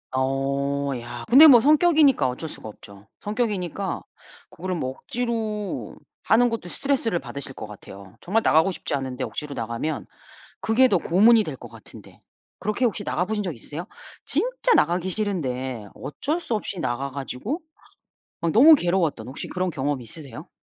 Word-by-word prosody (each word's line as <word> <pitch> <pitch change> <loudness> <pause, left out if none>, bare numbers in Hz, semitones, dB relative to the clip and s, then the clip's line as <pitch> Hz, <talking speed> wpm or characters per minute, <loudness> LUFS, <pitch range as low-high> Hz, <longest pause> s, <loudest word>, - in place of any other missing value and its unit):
어 140 +1 -1
야 120 0 -8
근데 280 +7 +10
뭐 255 -5 +9
성격이니까 300 - +4
어쩔 130 +6 -5
수가 110 -7 -9
없죠. 100 0 -14
성격이니까 200 -4 -2 0.5
그거를 185 +1 -4
뭐 130 -6 -2
억지로 220 - -4 0.3
하는 245 +2 +4
것도 225 -6 -5
스트레스를 250 -6 -1
받으실 140 -3 -8
것 105 - -8
같아요. 100 -1 -12
정말 215 +5 +1
나가고 160 +1 +4
싶지 - - -5
않은데 130 -2 -3
억지로 150 -2 -6
나가면 120 +7 -3 0.6
그게 255 +4 +4
더 190 - +3
고문이 215 +7 +5
될 150 -8 -6
것 120 - -11
같은데. 115 -1 -15 0.4
그렇게 215 +5 0
혹시 205 -2 -1
나가보신 210 +4 -1
적 180 -4 -3
있으세요? 150 +9 -7 0.4
진짜 - - +1
나가기 175 +3 +2
싫은데 130 - -3
어쩔 295 - -3
수 285 -9 -3
없이 205 -3 -4
나가 135 -1 -2
가지고 140 - -4 0.8
막 170 -1 +1
너무 295 - +8
괴로웠던 175 - 0
혹시 130 - -6
그런 185 0 -2
경험이 140 -2 -2
있으세요? 130 +1 -9
175 Hz, 350 characters per minute, -24 LUFS, 135-225 Hz, 0.8 s, 근데